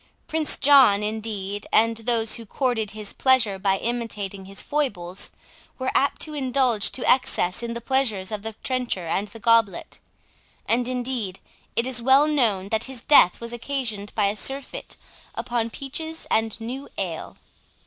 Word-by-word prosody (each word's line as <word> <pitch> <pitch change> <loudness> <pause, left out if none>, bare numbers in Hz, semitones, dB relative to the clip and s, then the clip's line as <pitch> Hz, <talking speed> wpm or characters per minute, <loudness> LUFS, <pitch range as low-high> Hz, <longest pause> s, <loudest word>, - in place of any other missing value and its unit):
Prince 315 -1 +3
John, 265 -8 +6
indeed, 210 -2 -4
and 230 +1 +3
those 225 -1 +1
who 230 - -6
courted 240 -3 -1
his 210 -1 -3
pleasure 245 -7 +2
by 195 0 +1
imitating 210 -4 -4
his 195 +1 -6
foibles, 200 -11 0 0.5
were 260 -1 -2
apt 280 - +1
to 310 - 0
indulge 255 -6 +1
to 255 - -3
excess 185 -7 +2
in 235 0 -4
the 235 - -6
pleasures 225 -7 0
of 210 -1 -3
the 220 +1 -5
trencher 250 -8 -1
and 195 +5 -1
the 225 +3 -11
goblet; 225 -4 +2 0.7
and 240 +1 +1
indeed 245 -6 -3 0.4
it 235 - +2
is 255 -2 +2
well 265 +4 +5
known 220 -10 +1
that 220 0 +2
his 260 -3 -6
death 230 -11 +6
was 235 0 -6
occasioned 235 -5 -3
by 210 - +2
a 200 +1 0
surfeit 270 +5 -3 0.4
upon 240 -2 -2
peaches 315 +6 -4
and 225 0 0
new 255 +5 -6
ale. 175 -5 -5
230 Hz, 160 wpm, -24 LUFS, 205-260 Hz, 0.7 s, John